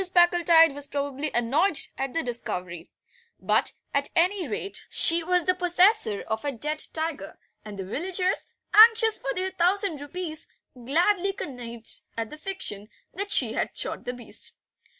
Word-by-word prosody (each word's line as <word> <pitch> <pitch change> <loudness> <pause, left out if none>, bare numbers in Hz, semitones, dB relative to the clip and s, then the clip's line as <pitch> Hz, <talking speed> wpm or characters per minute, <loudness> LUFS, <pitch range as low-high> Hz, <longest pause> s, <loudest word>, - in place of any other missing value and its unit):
Packletide 345 -3 +5
was 285 0 -3
pardonably 285 +1 -2
annoyed 290 +9 +1 0.2
at 270 -1 -4
the 330 - 0
discovery; 180 -8 -5 0.5
but, - - +1 0.2
at 280 0 +1
any 360 0 +2
rate, 395 - -4
she 335 +1 +6
was 360 0 +1
the 365 - +3
possessor 360 - +3
of 220 0 -4
a 290 - -2
dead 300 +5 -2
tiger, 315 -11 -5 0.3
and 210 -2 -9
the 190 - -5
villagers, 365 - -2 0.3
anxious 445 0 +6
for 275 - -3
their 375 +1 -2
thousand 370 -3 0
rupees, 315 +1 -5 0.3
gladly 345 - 0
connived 235 - -5 0.2
at 225 -1 -4
the 300 - -9
fiction 305 - -5 0.2
that 400 +2 -4
she - - +3
had - - -3
shot - - -3
the 245 - -3
beast. 245 -2 -6
315 Hz, 150 wpm, -25 LUFS, 245-365 Hz, 0.5 s, she